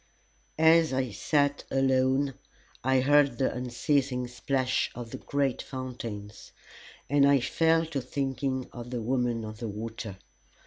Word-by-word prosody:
As 160 Hz, -1 st, +5 dB
I 130 Hz, -2 st, 0 dB
sat 145 Hz, +5 st, +1 dB
alone 135 Hz, +1 st, +2 dB, 0.5 s
I 130 Hz, 0 st, +3 dB
heard 145 Hz, +1 st, +4 dB
the 135 Hz, -, +1 dB
unceasing 125 Hz, +1 st, 0 dB
splash 130 Hz, +1 st, 0 dB
of 120 Hz, -1 st, -7 dB
the -, -, -6 dB
great 140 Hz, -3 st, -1 dB
fountains, 115 Hz, -6 st, -7 dB, 0.5 s
and 145 Hz, 0 st, +3 dB
I 140 Hz, -1 st, +5 dB
fell 165 Hz, +5 st, +2 dB
to 150 Hz, -4 st, -3 dB
thinking 135 Hz, -1 st, -2 dB
of 120 Hz, 0 st, -8 dB
the 120 Hz, -2 st, -3 dB
Woman 120 Hz, -2 st, 0 dB
of 110 Hz, 0 st, -8 dB
the 115 Hz, -2 st, -4 dB
Water. 110 Hz, -1 st, -6 dB
130 Hz, 135 wpm, -28 LUFS, 120-140 Hz, 0.5 s, As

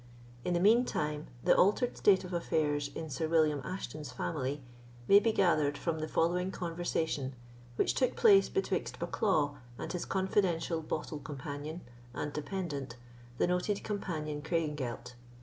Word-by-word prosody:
In 180 Hz, -, 0 dB
the -, -, +2 dB
mean 220 Hz, +6 st, +6 dB
time, 150 Hz, -8 st, -2 dB, 0.2 s
the -, -, +5 dB
altered 210 Hz, +6 st, +3 dB
state 195 Hz, -2 st, +4 dB
of 180 Hz, 0 st, -7 dB
affairs 150 Hz, -4 st, 0 dB
in 160 Hz, -, -4 dB
Sir 150 Hz, +5 st, -1 dB
William 155 Hz, -3 st, +3 dB
Ashton's 155 Hz, -7 st, -5 dB
family 130 Hz, +7 st, -3 dB, 0.4 s
may 200 Hz, -, +8 dB
be 225 Hz, +2 st, +2 dB
gathered 155 Hz, -8 st, +2 dB
from 160 Hz, +1 st, -2 dB
the 155 Hz, -, -2 dB
following 180 Hz, +4 st, +1 dB
conversation 165 Hz, -6 st, -2 dB, 0.4 s
which -, -, +2 dB
took 255 Hz, -, +1 dB
place 405 Hz, -4 st, +6 dB
betwixt 390 Hz, -, -1 dB
Bucklaw 155 Hz, -9 st, 0 dB, 0.2 s
and -, -, -5 dB
his 180 Hz, -, -3 dB
confidential 185 Hz, -4 st, 0 dB
bottle 155 Hz, -1 st, -4 dB
companion 145 Hz, +3 st, -6 dB, 0.3 s
and 145 Hz, -, -3 dB
dependant, 145 Hz, -5 st, -4 dB, 0.4 s
the -, -, +3 dB
noted 180 Hz, +3 st, 0 dB
Captain 155 Hz, -8 st, -3 dB
Craigengelt. 150 Hz, -7 st, -2 dB
160 Hz, 145 wpm, -32 LUFS, 145-185 Hz, 0.4 s, may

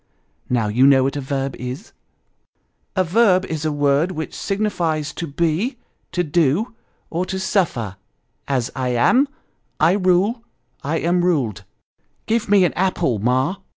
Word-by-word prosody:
" -, -, -45 dB
Now, 120 Hz, -4 st, +1 dB
you 125 Hz, +6 st, +4 dB
know 135 Hz, -2 st, +5 dB
what 135 Hz, +2 st, -1 dB
a 145 Hz, -, -2 dB
verb 135 Hz, 0 st, -3 dB
is? 125 Hz, -, -7 dB, 0.3 s
" -, -, -48 dB
" -, -, -46 dB, 0.3 s
A 185 Hz, -, +3 dB
verb 185 Hz, 0 st, +3 dB
is 160 Hz, -3 st, -4 dB
a 155 Hz, -, +1 dB
word 145 Hz, +4 st, +2 dB
which 160 Hz, -1 st, -5 dB
signifies 175 Hz, -7 st, -1 dB
to 170 Hz, -, -5 dB
be, 170 Hz, -, -1 dB, 0.3 s
to 175 Hz, -, 0 dB
do, 170 Hz, -, +1 dB, 0.4 s
or 170 Hz, +2 st, -1 dB
to 190 Hz, -, -3 dB
suffer; 155 Hz, -, -1 dB, 0.5 s
as, 130 Hz, -3 st, -1 dB
I 125 Hz, -2 st, -1 dB
am 250 Hz, -, +4 dB, 0.5 s
I 160 Hz, +2 st, +5 dB
rule 190 Hz, +4 st, +2 dB, 0.4 s
I 155 Hz, +4 st, -1 dB
am 175 Hz, +2 st, +1 dB
ruled. 125 Hz, -, 0 dB, 0.6 s
Give 225 Hz, -1 st, 0 dB
me 200 Hz, -2 st, +5 dB
an -, -, 0 dB
apple, 175 Hz, -, 0 dB
Ma." 130 Hz, -, +1 dB
160 Hz, 160 wpm, -21 LUFS, 135-185 Hz, 0.6 s, know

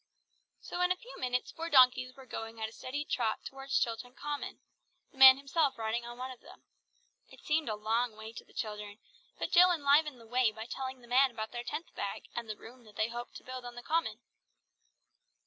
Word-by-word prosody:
So 355 Hz, -, -4 dB
in 360 Hz, 0 st, +3 dB
a -, -, +3 dB
few 470 Hz, +7 st, -12 dB
minutes, 250 Hz, -1 st, -1 dB
four 330 Hz, 0 st, -5 dB
donkeys 255 Hz, -2 st, +5 dB
were 265 Hz, -1 st, -13 dB
going 225 Hz, -2 st, -6 dB
at 220 Hz, -, -1 dB
a -, -, -11 dB
steady 285 Hz, +6 st, -5 dB
trot 230 Hz, -6 st, -1 dB
towards 270 Hz, 0 st, -2 dB
Chilton 245 Hz, +2 st, -2 dB
Common; 295 Hz, -1 st, -5 dB, 0.5 s
the 270 Hz, -, -19 dB
man 265 Hz, 0 st, +11 dB
himself 275 Hz, 0 st, +1 dB
riding 225 Hz, +1 st, -2 dB
on 240 Hz, 0 st, -8 dB
one 255 Hz, +1 st, -5 dB
of 255 Hz, -, -11 dB
them. -, -, -16 dB, 0.7 s
It -, -, -15 dB
seemed 305 Hz, -3 st, 0 dB
a 215 Hz, -, -1 dB
long 225 Hz, +2 st, 0 dB
way 220 Hz, +1 st, -9 dB
to -, -, -8 dB
the -, -, -23 dB
children, 210 Hz, -2 st, -5 dB, 0.4 s
but -, -, -3 dB
Jill 360 Hz, +1 st, +8 dB
enlivened 290 Hz, -3 st, +3 dB
the 230 Hz, -, -14 dB
way 245 Hz, 0 st, +2 dB
by 220 Hz, +1 st, -7 dB
telling 260 Hz, +1 st, -5 dB
the 240 Hz, -, -16 dB
man 260 Hz, +3 st, +5 dB
about 220 Hz, -2 st, -5 dB
their 240 Hz, 0 st, -5 dB
tenth 325 Hz, -, -5 dB
bag, 200 Hz, -, -4 dB
and 235 Hz, -2 st, -4 dB
the 215 Hz, -, -4 dB
room 245 Hz, +2 st, -13 dB
that 210 Hz, -1 st, -16 dB
they 215 Hz, +2 st, +1 dB
hoped 240 Hz, +1 st, -7 dB
to -, -, -9 dB
build 255 Hz, 0 st, -7 dB
on 245 Hz, 0 st, -8 dB
the 240 Hz, -, -8 dB
Common. 310 Hz, -9 st, 0 dB
250 Hz, 215 wpm, -32 LUFS, 225-275 Hz, 0.7 s, man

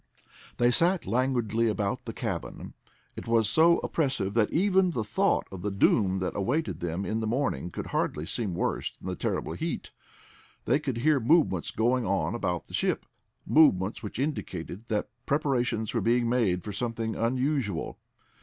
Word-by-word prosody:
They 120 Hz, 0 st, +4 dB
sat 175 Hz, +7 st, +2 dB
languidly 115 Hz, -1 st, +1 dB
about 105 Hz, -2 st, -1 dB
the -, -, -4 dB
cabin. -, -, -5 dB, 0.4 s
It -, -, -8 dB
was 115 Hz, -2 st, +3 dB
so 170 Hz, +2 st, +5 dB
oppressive 130 Hz, -11 st, -1 dB
that 110 Hz, -2 st, +2 dB
even 190 Hz, +1 st, +3 dB
the 120 Hz, -10 st, -2 dB
thought 105 Hz, -, +1 dB
of 95 Hz, -2 st, -7 dB
the 105 Hz, -, -1 dB
doom 100 Hz, -1 st, +2 dB
that 95 Hz, -1 st, -2 dB
awaited 145 Hz, +11 st, -1 dB
them 85 Hz, +3 st, -3 dB
in 110 Hz, -, -1 dB
the 110 Hz, -, -2 dB
morning 125 Hz, -6 st, -1 dB
could -, -, -6 dB
hardly 75 Hz, -, -1 dB
seem 100 Hz, -2 st, -3 dB
worse -, -, -1 dB
than -, -, -10 dB
the 90 Hz, -, -2 dB
terrible -, -, -2 dB
heat. -, -, -4 dB, 0.7 s
They 135 Hz, +4 st, +3 dB
could 135 Hz, -6 st, -3 dB
hear 145 Hz, +4 st, +3 dB
movements 125 Hz, -, +2 dB
going 120 Hz, +3 st, +1 dB
on 95 Hz, +3 st, 0 dB
about 90 Hz, -7 st, -2 dB
the -, -, -16 dB
ship, -, -, 0 dB, 0.4 s
movements 105 Hz, -12 st, +4 dB
which 105 Hz, -2 st, -6 dB
indicated 115 Hz, -, -4 dB
that 105 Hz, -2 st, -2 dB, 0.2 s
preparations 125 Hz, -6 st, 0 dB
were 115 Hz, -, 0 dB
being 120 Hz, +3 st, +2 dB
made 110 Hz, -8 st, +1 dB
for 105 Hz, -, -5 dB
something 115 Hz, 0 st, -2 dB
unusual. 125 Hz, -, -1 dB
115 Hz, 165 wpm, -28 LUFS, 100-135 Hz, 0.7 s, so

